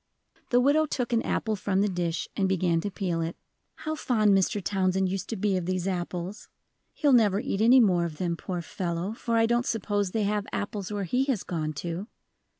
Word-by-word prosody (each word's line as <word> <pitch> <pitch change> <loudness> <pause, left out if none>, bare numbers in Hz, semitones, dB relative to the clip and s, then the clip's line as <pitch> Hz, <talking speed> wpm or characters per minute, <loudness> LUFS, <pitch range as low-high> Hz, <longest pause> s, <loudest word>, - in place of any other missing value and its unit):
The 245 - +4
widow 290 +4 +3
took 250 -3 -2
an 230 - +3
apple 220 -1 -1
from 195 0 0
the 205 - +3
dish 175 -3 -2
and 195 -1 +1
began 175 -3 +1
to 205 - -2
peel 180 -4 -2
it. 165 +1 -3 0.4
"How 310 - -4
fond 220 -9 +2
Mr. 195 +2 +2
Townsend 190 -1 +1
used 190 0 -4
to 225 - -2
be 200 -1 0
of 180 -1 -3
these 185 0 -1
apples! 180 +1 -4 0.5
He'll 290 -3 +3
never 210 -5 +4
eat 220 -5 -2
any 245 +4 +7
more 180 -7 +4
of 160 -3 -6
them, 170 -1 -1
poor 175 0 -4
fellow, 175 +2 -3
for 230 0 -1
I 225 - +5
don't 240 +1 +2
suppose 205 -2 0
they 215 +3 -1
have 205 0 -1
apples 205 -1 -4
where 205 -1 -2
he 250 +9 +1
has 265 -8 -1
gone 155 -3 -3
to. 175 +5 -4
195 Hz, 210 wpm, -27 LUFS, 180-225 Hz, 0.5 s, any